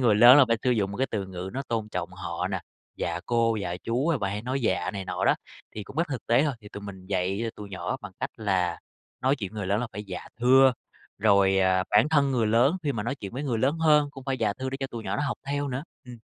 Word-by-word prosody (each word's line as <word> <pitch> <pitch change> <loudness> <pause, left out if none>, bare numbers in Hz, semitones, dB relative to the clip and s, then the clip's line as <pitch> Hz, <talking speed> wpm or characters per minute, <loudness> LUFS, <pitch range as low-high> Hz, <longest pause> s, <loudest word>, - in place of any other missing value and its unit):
người 115 -5 +4
lớn 120 +5 +9
là 140 - +8
phải 115 - +3
sử 125 - +2
dụng 105 -5 +1
một 100 - -6
cái 135 - +1
từ 100 -3 -2
ngữ 95 0 -6
nó 135 - -3
tôn 110 -2 -2
trọng - - -4
họ - - -4
nè, - - -2 0.4
"dạ - - -2
cô", 115 -1 +2
"dạ 90 -4 -3
chú" 125 +7 0
à 165 -4 +2
bà 100 -3 -1
hay 100 +2 -4
nói 130 +3 -2
"dạ" 95 -7 0
này 100 -2 -5
nọ - - -2
đó. - - +5 0.4
Thì 105 - -5
cũng 135 - -12
rất 170 +1 +1
thực 135 -5 -5
tế 120 +3 +4
thôi, 145 -3 0
thì 105 - -12
tụi 100 - -8
mình 95 -2 -9
dạy 95 +1 -1
cho 115 - -2
tụi 105 -1 -8
nhỏ 90 -1 -3
bằng 105 -2 -9
cách - - -2
là 95 -6 0 0.4
nói 135 +2 +2
chuyện 100 -5 -5
với 110 - -7
người 100 - -3
lớn 100 +3 +1
là 125 - -2
phải 105 +2 -6
"dạ, 95 -3 -7
thưa". 130 +2 +6 0.5
Rồi, 100 -2 +4
ờ, 95 -1 +3
bản 110 +7 +5
thân 140 -3 +3
người 120 -4 +1
lớn 120 +10 +3
khi 145 -2 0
mà 110 -5 -3
nói 115 +5 -2
chuyện 100 -8 -8
với 130 +4 -4
người 125 -6 -1
lớn 140 +7 +1
hơn 150 -2 +4
cũng 135 -2 -11
phải 135 -1 -2
"dạ, 110 -3 +1
thưa" 130 0 -3
để 135 - -3
cho 135 - -1
tụi 115 -4 -8
nhỏ - - -2
nó 145 - -1
học 135 - -2
theo 145 0 -1
nữa. 130 +1 -3 0.2
Ừm. 125 -2 -10
115 Hz, 290 wpm, -27 LUFS, 100-135 Hz, 0.5 s, lớn